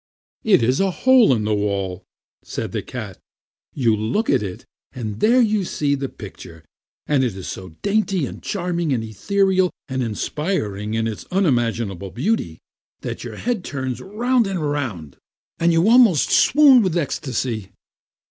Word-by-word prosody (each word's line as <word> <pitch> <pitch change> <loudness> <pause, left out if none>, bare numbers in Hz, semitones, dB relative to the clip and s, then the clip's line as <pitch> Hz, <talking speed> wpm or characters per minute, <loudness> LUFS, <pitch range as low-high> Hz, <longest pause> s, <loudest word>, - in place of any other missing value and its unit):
"It 195 - +4
is 125 +3 +2
a 195 - +2
hole 245 - +5
in 115 -4 +1
the 105 0 0
wall," 100 -3 -2 0.4
said - - -5
the - - -2
cat. - - -7 0.6
"You 120 -6 +2
look 110 - 0
in 130 -5 +2
it, 95 -3 -7 0.3
and 110 -4 -5
there 240 +4 +4
you 215 -3 +2
see 145 -5 -1
the 135 -1 -2
picture, 80 -1 -11 0.4
and 140 -3 +2
it 120 -6 -1
is 95 - -7
so 95 -4 -8
dainty 200 -5 +1
and - - -8
charming 175 -5 -2
and 115 -3 -1
ethereal 190 - +1 0.2
and 130 -1 -2
inspiring 110 - -2
in 115 0 0
its 110 -2 -5
unimaginable 115 - 0
beauty 120 - -1 0.4
that - - -5
your - - -7
head 235 -5 -2
turns 130 -3 -4
round 235 +4 +1
and 190 -2 -2
round, 105 - -4 0.4
and 170 +1 +3
you 165 +4 +3
almost 230 - +5
swoon 280 -3 +6
with 185 -4 0
ecstasy." 125 - -2
140 Hz, 155 wpm, -21 LUFS, -, 0.6 s, swoon